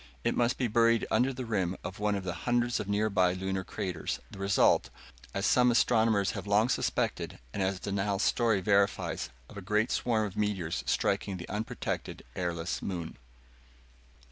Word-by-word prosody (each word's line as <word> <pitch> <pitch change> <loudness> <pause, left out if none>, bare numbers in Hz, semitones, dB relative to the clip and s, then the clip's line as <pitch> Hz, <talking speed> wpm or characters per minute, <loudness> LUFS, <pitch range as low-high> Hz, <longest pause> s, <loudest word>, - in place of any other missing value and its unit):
It 120 - +1
must 120 0 +2
be 125 - +1
buried 115 0 +3
under 125 +4 +3
the 130 -1 -5
rim 95 -5 -1
of 95 - -6
one 105 0 +1
of 100 - -3
the 90 -2 -3 0.2
hundreds 120 0 +2
of 100 - -4
nearby 100 -3 +2
Lunar 95 0 -2
craters 90 -2 -3
the 100 - -10
result, 95 -10 +3 0.4
as 100 +1 -2
some 125 0 +5
astronomers 110 -4 +3
have - - -6
long 105 +4 +3
suspected - - -1 0.2
and - - -2
as 95 0 0
Dunal's 100 0 -1
story 115 -5 +2
verifies, 100 +1 +1 0.2
of - - -12
a - - -5
great 105 +4 +1
swarm 110 -3 +1
of 100 - -6
meteors 95 -6 -1
striking 95 -2 0
the 90 - -8
unprotected, 105 +2 -4
airless 85 -1 -2
moon. 85 -8 -5
100 Hz, 170 wpm, -30 LUFS, 95-115 Hz, 0.4 s, some